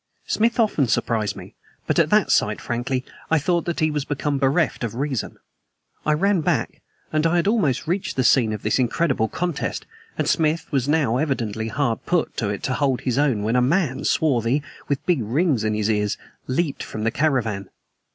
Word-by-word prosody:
Smith 230 +2 +1
often 200 - +2
surprised 110 -1 0
me, - - -11 0.3
but - - +1
at - - +3
that - - +3
sight, - - +2
frankly, 125 +2 -2 0.2
I 160 - +4
thought 170 +3 0
that 170 -2 -2
he 155 0 +3
was 150 -2 -1
become 145 0 -2
bereft 140 +1 +1
of 115 -1 -3
reason. 135 -2 -3 0.7
I 150 - +4
ran 190 +3 +2
back; - - -1 0.3
and 155 +1 +3
I 170 - +1
had 175 - +2
almost 200 - +1
reached 180 +4 -2
the 130 - +1
scene 120 -3 +4
of 105 -1 -5
this 105 - +1
incredible 130 -1 +1
contest, 175 +3 -3 0.3
and - - 0
Smith 160 0 +1 0.2
now 145 -6 +2
was 125 - +1
evidently 115 -7 -2
hard 120 -1 -1
put 175 -2 0
to 105 - -1
it 100 - -4
to 130 - 0
hold 135 -2 0
his 130 0 0
own 130 -8 +2
when 110 +3 0
a 125 - +4
man, 140 0 +1
swarthy, 135 -2 +1 0.2
with 140 -1 -2
big 175 -8 +2
rings 130 - +1
in 110 0 0
his 105 -1 0
ears, 105 -2 0 0.3
leaped 140 +2 -1
from 110 - -5
the 115 - +1
caravan. 120 -10 0
135 Hz, 195 wpm, -23 LUFS, 115-160 Hz, 0.7 s, I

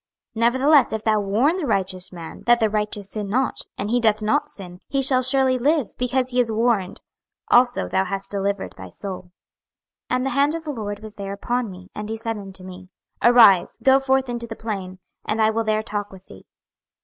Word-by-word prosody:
26:003:021 - - -5
Nevertheless 265 +2 +4
if 220 -1 -3
thou 215 -1 +2
warn 220 - +1
the 355 - -2
righteous 185 -4 -1
man, 170 -3 -9
that 240 0 +5
the 220 -2 +1
righteous 210 -1 -2
sin 210 -2 -4
not, 260 +5 0 0.2
and 205 +2 -3
he 245 - +3
doth 215 -2 +2
not 290 +7 +1
sin, 180 -2 -8
he 275 - -1
shall 260 -1 +3
surely 260 0 +3
live, 290 -2 +1
because 250 +1 0
he 250 - 0
is 235 -2 +2
warned; 220 -4 0 0.5
also 245 - +4
thou 190 - +1
hast 195 +1 -4
delivered 200 0 -2
thy - - -10
soul. 185 -3 -7 0.8
26:003:022 - - +1
And 255 +1 -1
the - - 0
hand 285 +4 +2
of 330 - -5
the 305 - -4
LORD 205 -5 -5
was 215 -1 -8
there 200 -1 -6
upon 240 +3 -2
me; 185 +1 -12
and 210 0 -6
he 225 - -3
said 225 -1 -3
unto 195 -2 -11
me, 185 0 -11 0.3
Arise, 230 -7 +6
go 265 0 +6
forth 265 -1 +1
into 240 -1 -5
the 225 - -7
plain, 195 -5 -5 0.3
and 215 - -2
I 220 0 +4
will 225 +1 -1
there 215 0 0
talk 205 -2 -4
with 190 -1 -14
thee. 95 - -15
220 Hz, 215 wpm, -22 LUFS, 200-250 Hz, 0.8 s, Arise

